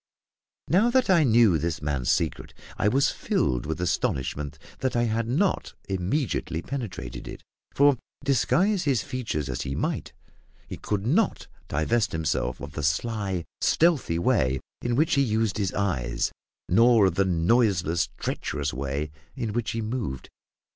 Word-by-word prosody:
Now 195 - +4
that 255 -4 +3
I 170 -4 +5
knew 115 - +5
this 80 +1 -2
man's 70 -5 -2
secret - - -1 0.2
I - - +1
was 135 +6 +3
filled 60 +3 -1
with 80 +2 -3
astonishment 75 -3 -1 0.2
that 130 -2 -1
I 120 - +3
had 115 0 0
not 165 - 0
immediately 95 - -1
penetrated 115 - -6
it; - - -9 0.3
for, 140 -1 +5 0.3
disguise 175 - +2
his 135 -6 +2
features 125 - -3
as 65 -2 -3
he 65 - -3
might, - - -2 0.6
he - - -6
could 105 -1 -2
not 175 - +1 0.2
divest 105 +10 0
himself 75 -6 -1
of 70 - -7
the 75 - -5
sly, 95 +4 -1 0.2
stealthy 155 - +2
way 65 -6 +2 0.2
in 120 -1 0
which 155 +5 +2
he 140 - +4
used 110 -4 0
his 100 -2 0
eyes, 70 -13 -1 0.4
nor 115 +2 +5
of 95 - +2
the 95 +3 +2
noiseless, 90 -1 +2
treacherous 75 -2 -3
way 70 +3 -3 0.2
in 115 -6 -3
which 115 -1 -1
he 115 0 -2
moved. 110 - -4
105 Hz, 150 wpm, -26 LUFS, 75-125 Hz, 0.6 s, I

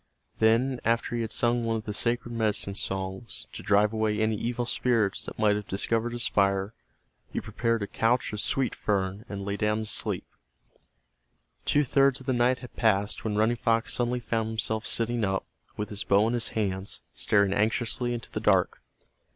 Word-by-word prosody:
Then, 120 +4 +3
after 115 +1 0
he 120 - -1
had 115 -1 -3
sung 120 0 +1
one 115 0 0
of 110 - -3
the 105 - -3
sacred 120 +2 0
medicine 110 -3 0
songs 95 +3 -4
to - - -7
drive 105 +1 +3
away 110 -1 0
any 110 0 +2
evil 120 +3 -2
spirits 115 -5 +1
that - - -7
might 105 -1 +3
have 105 -1 -4
discovered 115 +4 0
his 120 0 -1
fire, 100 +1 +1 0.6
he - - -2
prepared 115 -2 -1
a - - -3
couch 115 +2 +1
of 105 - -2
sweet 135 -1 0
fern 100 +1 -1
and 100 -1 -5
lay 100 0 -2
down 105 +1 +1
to - - -4
sleep. - - -1 1.4
Two 145 - +3
thirds 135 0 +3
of 130 - -13
the 130 - +1
night 125 +1 +3
had - - -15
passed 105 -3 +1
when 105 -2 -1
Running 110 +3 +2
Fox 115 0 +1
suddenly 125 0 0
found 115 -1 -1
himself 110 0 -2
sitting 115 0 0
up, 95 -1 0 0.3
with 105 - -3
his 105 -1 -4
bow 100 +2 +4
in 115 - 0
his 120 -1 0
hands, 95 -2 -2
staring 100 -2 +2
anxiously 115 +3 0
into 120 -2 -5
the - - -3
dark. - - +2
110 Hz, 190 wpm, -27 LUFS, 105-120 Hz, 1.4 s, bow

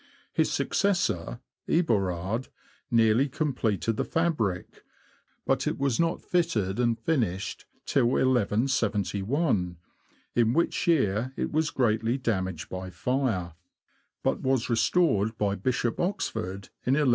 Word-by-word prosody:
His - - +2
successor, 150 - 0 0.3
Eborard, 105 - +1 0.4
nearly 115 +2 +4
completed 115 - -1
the - - +1
fabric; 150 - -1 0.6
but - - +1
it - - -1
was 135 -4 0
not 165 0 0
fitted 120 - 0
and 120 -2 +2
finished 110 - -1 0.2
till 120 - +2
1171, 110 - +1 0.6
in 115 -1 +3
which 170 +4 0
year 130 - +2
it - - -2
was 155 0 +1
greatly 115 0 +1
damaged 95 - -2
by 95 0 -6
fire, 100 - -1 0.7
but - - 0
was 130 -2 0
restored 110 - +2
by 100 -1 +1
Bishop 120 +3 -1
Oxford 110 - -2
in 130 - +2
1197. 145 -3 +3
115 Hz, 115 wpm, -27 LUFS, 100-135 Hz, 0.7 s, nearly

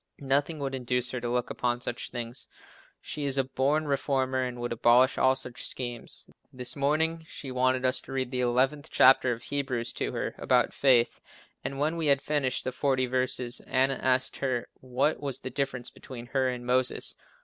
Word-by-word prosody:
Nothing 140 +3 +1
would 140 -2 -3
induce 125 -1 0
her 125 - -4
to 120 - -2
look 125 0 -1
upon 120 0 -1
such 120 0 -4
things. 120 +1 -4 0.5
She 150 - -4
is 140 -1 0
a 135 - +3
born 140 +4 0
reformer 135 -2 0
and 125 -1 -3
would 120 0 -3
abolish 120 +3 +4
all 130 0 +4
such 125 -2 +1
schemes. 120 -2 -5 0.2
This 125 -1 -3
morning 160 +3 +1
she 135 - -7
wanted 130 0 +1
us 130 - +1
to - - -12
read 130 -2 -2
the 130 - -2
11th 130 +4 +1
chapter 130 -1 +5
of 120 0 -4
Hebrews 130 -4 -2
to - - -2
her, - - -2
about - - +2
faith, 125 -4 +3 0.4
and 135 - -4
when 155 +4 0
we 160 -2 -1
had 140 -1 +3
finished 140 -4 0
the 130 - -2
forty 130 0 +1
verses, 125 -1 -1
Anna 135 +1 +2
asked 130 0 +1
her 130 -3 -2
what 130 +4 0
was 140 -3 -3
the 130 - -5
difference 135 -2 -2
between 120 -2 -10
her 130 -1 +2
and 125 -1 -5
Moses. 125 +1 +1
130 Hz, 190 wpm, -28 LUFS, 125-135 Hz, 0.5 s, chapter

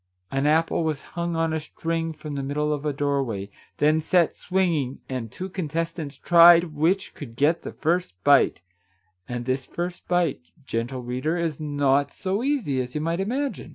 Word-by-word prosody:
An 135 +2 +1
apple 165 +2 +2
was 155 -3 -2
hung 170 -1 -2
on 165 -1 0
a 160 - 0
string 165 +1 -3
from 150 -1 -8
the 140 - -2
middle 150 +2 -1
of 150 +1 -3
a - - +1
doorway, 135 -8 -2 0.3
then 155 +2 +3
set 170 +1 +3
swing 185 -1 0
ing, 135 -4 -2
and 125 -4 -4
two 185 - -5
contestants 165 -4 -3
tried 170 -1 +7
which 170 +6 +1
could 115 -6 -9
get 150 +6 +2
the - - -7
first 170 - -1
bite, 140 - +4 0.3
— 95 -1 -38
and 120 -1 -4
this 130 0 -1
first 175 +1 -5
bite, 175 - +1 0.2
gentle 120 +1 -3
reader, 130 +7 -1
is 165 -4 -2
not 145 -2 +1
so 195 +3 -2
easy 240 - 0
as 125 0 -7
you 150 - -1
might 165 +2 -1
imagine 260 +8 -2
150 Hz, 185 wpm, -25 LUFS, 135-170 Hz, 0.3 s, tried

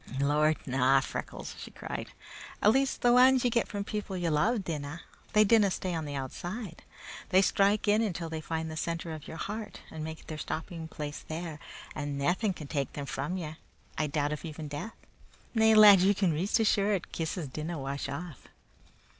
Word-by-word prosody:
"Lord, 150 +2 +3
na! 135 +1 +4
Freckles," 135 - -5
she - - -8
cried. - - -6 0.5
"At 210 - +5
least, 270 +2 +1
the 245 0 +6
anes 260 0 +6
ye 245 - +2
get 235 0 +2
from 205 -1 -3
people 205 -2 -4
ye 175 -2 0
love 200 +9 +2
dinna. 155 -1 -4 0.3
They 215 - +7
dinna 215 -1 +5
stay 185 -1 -2
on 160 -2 -2
the 145 -1 -5
outside. 175 - -5 0.5
They 190 0 +5
strike 200 +2 +2
in 210 +2 +4
until 180 -6 -2
they 160 -1 -4
find 160 0 -3
the - - -6
center 165 +1 -3
of 155 -2 -8
your 160 - -7
heart 210 +1 -5
and 155 -1 -6
make 160 0 -7
their 155 -1 -6
stopping 160 +1 -5
place 150 -2 -6
there, 160 -1 -5 0.3
and 145 -2 -3
naething 180 +8 +1
can 155 - -8
take 140 -2 -2
them 145 - -4
from 180 +6 -3
ye 155 -3 -6 0.4
I 155 - 0
doubt 145 0 0
if 150 - -6
even 155 -2 -6
death 145 +10 -6 0.6
Na, 220 -1 +3
lad, 210 -2 +10
ye 200 +2 +4
can 190 -3 +2
be 150 - -1
reet 200 +7 +1
sure 200 -1 +3
kisses 165 -1 -4
dinna 155 +5 -4
wash 140 0 -4
off!" 155 0 -7
165 Hz, 195 wpm, -30 LUFS, 150-200 Hz, 0.6 s, lad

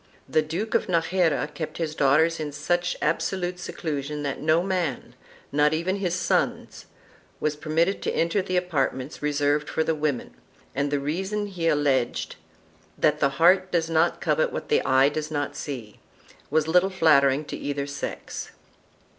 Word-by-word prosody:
The 155 - +2
Duke 170 +9 -4
of - - +2
Najera 165 -3 +1
kept 155 - -5
his 160 -2 -2
daughters 155 +3 +3
in 150 -1 -3
such 175 +5 -1
absolute 175 +3 -1
seclusion 150 -4 -4
that 140 -2 -3
no 155 +3 +3
man, 180 -8 -2 0.4
not 150 +2 +3
even 185 +5 -1
his 180 -3 -1
sons, 170 -2 -1 0.5
was 150 -1 0
permitted 165 +5 0
to - - -1
enter 170 +4 +1
the 185 -1 -1
apart 180 -7 0
ments 130 +3 -8
reserved 145 0 +1
for 160 - 0
the 160 - +1
women, 150 -4 -2 0.4
and 140 +1 0
the 145 0 0
reason 190 +9 -2
he 180 -5 -3
alleged 145 -5 +1 0.3
— - - -33
that 150 0 +2
the 140 - +3
heart 185 +3 +4
does 165 -1 0
not 160 0 +2
covet - - +1
what - - -5
the 450 - +3
eye 130 +1 +4
does 155 +1 -4
not 145 -2 -2
see 120 -8 -6 0.2
— - - -26
was 155 0 +2
little 180 +3 +4
flattering 150 -5 +4
to - - -6
either 140 -1 -3
sex. 140 0 -6
155 Hz, 170 wpm, -25 LUFS, 145-175 Hz, 0.5 s, heart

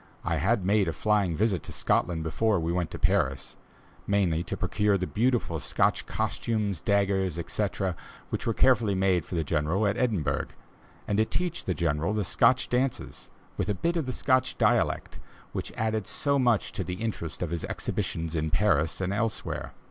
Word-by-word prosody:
I 85 - +1
had 95 - +1
made 100 0 +3
a 80 - -1
flying 100 -4 +1
visit 100 -1 +1
to - - -9
Scotland 85 -2 +1
before 100 +5 +1
we 80 +1 -1
went 90 -2 -1
to - - -7
Paris 85 -9 0 0.5
mainly 95 -5 +2
to - - -4
procure 105 +2 +1
the 90 - -2
beautiful 115 -6 0
Scotch - - +1
costumes, 105 -7 -1
daggers, 95 -4 +1
etc., 95 +1 -2 0.4
which - - -3
were 115 - +2
carefully 115 -6 +3
made 95 -3 +2
for - - -6
the 80 - +1
General 80 +7 0
at 100 +2 +1
Edinburgh, 95 - 0 0.6
and 105 0 +1
to 110 - +4
teach 175 +6 -2
the 90 - -1
General 85 +4 0
the 105 - 0
Scotch 130 +7 +3
dances, 125 +1 -2 0.3
with - - -1
a 105 - +1
bit 170 - -1
of 160 -6 -1
the - - -1
Scotch 130 0 +1
dialect, - - +1 0.3
which - - -4
added 110 -2 -1
so 140 -1 +1
much 120 -5 +2
to 100 -1 -3
the 90 +1 -4
interest 90 -6 -4
of 85 - -3
his 85 -2 -3
exhibitions 80 -1 -2
in 80 -1 -1
Paris 85 -2 +1
and 95 +1 -1
elsewhere. 115 +1 -2
100 Hz, 180 wpm, -28 LUFS, 85-110 Hz, 0.6 s, to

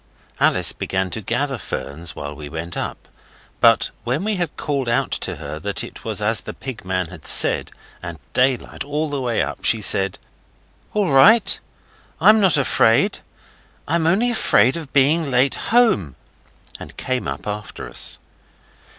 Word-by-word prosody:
Alice - - +3
began 95 -1 -3
to 110 - -3
gather 125 +5 -2
ferns 75 0 -5
while 70 0 -6
we 75 -1 -9
went 80 +2 -6
up, - - -5 0.5
but - - +4
when 130 +8 -1
we 215 0 -1
had 175 -4 -3
called 140 -5 -2
out 120 - 0
to - - -2
her 75 0 -7
that 100 +3 -3
it - - -10
was - - -2
as - - +2
the - - -8
pig 130 -4 -8
man 90 -2 -2
had 90 -5 -11
said, - - +5 0.3
and 85 -1 -7 0.2
daylight 130 0 0
all 150 +1 -3
the 140 -2 -2
way 120 -3 0
up, - - -6
she 115 - +3
said 95 -2 -1 0.8
'All 205 -6 +1
right. 195 +10 +6 0.6
I'm 215 +1 +6
not 185 -6 +4
afraid. 115 -4 +2 0.7
I'm 160 +1 +1
only 215 +8 +3
afraid 130 - +3
of 160 -5 -7
being 145 +3 +2
late 130 +1 +2 0.2
home,' 220 - +3 0.6
and - - -11
came 130 - -2
up 70 +1 -5
after 105 0 -6
us. - - -4
125 Hz, 160 wpm, -20 LUFS, 95-155 Hz, 0.8 s, right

